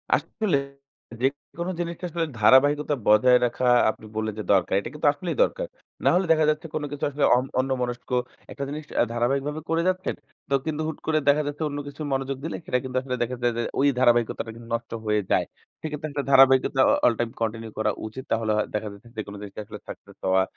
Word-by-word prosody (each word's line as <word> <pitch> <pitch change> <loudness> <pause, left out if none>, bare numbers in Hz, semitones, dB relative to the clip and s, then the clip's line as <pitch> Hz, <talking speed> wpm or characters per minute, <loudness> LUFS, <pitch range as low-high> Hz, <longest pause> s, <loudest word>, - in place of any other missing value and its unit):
আসলে 200 -10 0 0.6
যেকোনো 145 +6 -2
জিনিসটা 170 +1 -4
আসলে 165 0 -1
ধারাবাহিকতা 145 +6 +5
বজায় 125 +4 +6
রাখা 120 +1 -2 0.2
আপনি 110 - -5
বললেন 110 0 -1
যে 105 - -3
দরকার। 95 -3 +3
এটা - - -6
কিন্তু 150 0 0
আসলেই 170 +5 -4
দরকার। - - -2 0.4
নাহলে 185 +2 +4
দেখা 155 -1 +4
যাচ্ছে 155 +2 -1
কোন 150 - -1
কিছু 145 - -6
আসলে 145 0 -2
অন 125 - 0
অন্যমনস্ক 125 -2 -2 0.4
একটা 140 - -5
জিনিস 150 +2 -5 0.3
ধারাবাহিকভাবে 135 +6 0
করে 165 +1 +2
যাচ্ছেন। 185 +1 0 0.3
তো - - -1
কিন্তু 155 -1 -2
হুট 160 - -4
করে 155 -1 +3
দেখা 150 +1 +4
যাচ্ছে 145 +2 -3
অন্য 145 0 -4
কিছু 145 +2 -9
মনোযোগ 135 0 -2
দিলে 165 - -3
সেটা 125 - +1
কিন্তু 130 -1 -3
আসলে 130 -1 -3
দেখা 125 +2 -3
যায় 120 -1 +2
যে 120 - +1 0.2
ওই 140 - +4
ধারাবাহিকতাটা 120 -2 +2
কিন্তু 115 0 -12
নষ্ট 115 0 -6
হয়ে 105 0 +2
যায়। - - +3 0.4
সে - - -8
ক্ষেত্রে 150 +1 -4
একটা 140 -1 -2
ধারাবাহিকতা 135 0 +6
অ - - +4
অল 120 - +5
টাইম 120 - 0
কন্টিনিউ 115 0 -2
করা 110 0 +1 0.2
উচিত। 130 +4 -8
তাহলে 110 -1 +1
হ - - +2
দেখা 105 0 -2
যাচ্ছে 100 +4 -15
যেকোন 105 -1 -5
জিনিসে 100 0 -8
আসলে - - -9
সাকসেস - - -11
হওয়া 95 0 +4
135 Hz, 200 wpm, -25 LUFS, 115-150 Hz, 0.6 s, বজায়